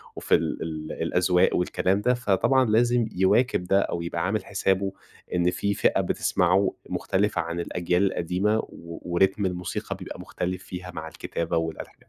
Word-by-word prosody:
وفي - - +2
ال 80 -1 -3
الأذواق 90 +2 +2
والكلام 95 +2 +1
ده. 125 +4 +3
فطبعًا 125 +3 +2
لازم 120 +1 +3
يواكب 95 +4 +3
ده 95 +2 +3
أو 85 - -2
يبقى 85 0 -2
عامل 100 0 -1
حسابه 95 -1 0 0.4
إن 90 0 +3
في 100 +3 -1
فئة - - +2
بتسمعه 95 +2 +2 0.2
مختلفة 100 -2 0
عن 85 +1 -4
الأجيال 90 +2 0
القديمة، 95 +5 0
و 85 -5 -8
وريتم 95 +3 +2
الموسيقى 90 0 -3
بيبقى - - -8
مختلف 90 +1 -4
فيها 90 -1 -7
مع 80 -1 -6
الكتابة 85 +1 -3
والألحا 80 0 -4
90 Hz, 150 wpm, -26 LUFS, 85-100 Hz, 0.4 s, ده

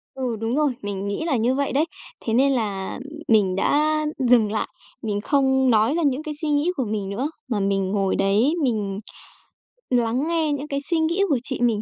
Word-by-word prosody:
Ừ, 255 -4 -2
đúng 225 +2 -1
rồi, 295 -2 +2
mình 200 -1 -4
nghĩ 205 +10 -2
là 310 -6 +1
như 240 +4 +1
vậy 280 0 -1
đấy. 300 +4 +3 0.4
Thế 225 - 0
nên 270 +3 +4
là 205 -5 -2 0.3
mình 205 -5 +3
đã 305 +9 +2 0.3
dừng 225 -4 +5
lại, 215 - -1 0.3
mình 205 -2 -2
không 265 0 +2
nói 220 +3 +4
ra 340 - 0
những 285 +1 +1
cái 305 - -4
suy 310 - -1
nghĩ 295 +4 +2
của 260 -7 -1
mình 205 -2 -3
nữa, 250 +9 -2 0.2
mà 220 -5 -1
mình 195 -1 0
ngồi 195 -2 +1
đấy 210 +9 +2
mình 210 -6 -1 0.9
lắng 245 +3 +1
nghe 325 -2 +1
những 285 +1 -4
cái 280 -1 -2
suy 335 -2 +2
nghĩ 335 +5 +1
của 275 -5 +2
chị 260 -1 -4
mình. 230 -3 +2
245 Hz, 210 wpm, -23 LUFS, 210-285 Hz, 0.9 s, dừng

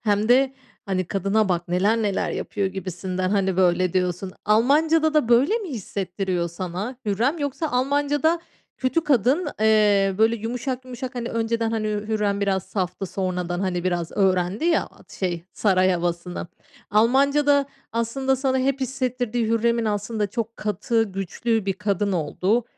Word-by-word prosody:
hem 210 0 +1
de, 265 +2 +4 0.3
hani, 185 -1 0
"Kadına 195 +3 +1
bak, 175 0 -1
neler 195 +6 +2
neler 200 -2 0
yapıyor." 200 -2 -2
gibisinden, 185 0 -3
hani, 190 -3 +1
böyle 180 -1 +3
diyorsun. 185 0 -1
Almancada 310 +8 +3
da 295 -6 +3
böyle 270 - +4
mi 400 -6 -6
hissettiriyor 190 -5 -3
sana 185 +8 -5
Hürrem? 240 - +1
Yoksa 290 +2 -2
Almancada 290 +5 +1 0.4
kötü 260 +6 0
kadın 275 - +2
eee, 210 -3 +4
böyle 225 +1 +4
yumuşak 250 +3 -4
yumuşak, 255 +1 -7
hani, 240 -1 -3
önceden, 230 0 -1
hani, 220 -1 -1
Hürrem 210 -1 -1
biraz 195 -2 +1
saftı, 185 -1 -3
sonradan, 180 -1 -2
hani, 180 -2 -1
biraz 175 -2 -1
öğrendi 190 - +1
ya, 340 -1 +3
at - - -19
şey, 175 -3 -2
saray 185 -3 +3
havasını. 175 0 -2 0.4
Almancada 280 +6 +3 0.3
aslında 265 +4 0
sana 265 0 0
hep 270 +1 0
hissettirdiği 250 -3 -1
Hürrem'in 230 +1 +1
aslında 210 0 -1
çok 225 +2 -4
katı 215 +2 0
güçlü 200 +2 -2
bir 195 - +2
kadın 200 0 -1
olduğu 185 +8 0
215 Hz, 145 wpm, -23 LUFS, 190-255 Hz, 0.4 s, de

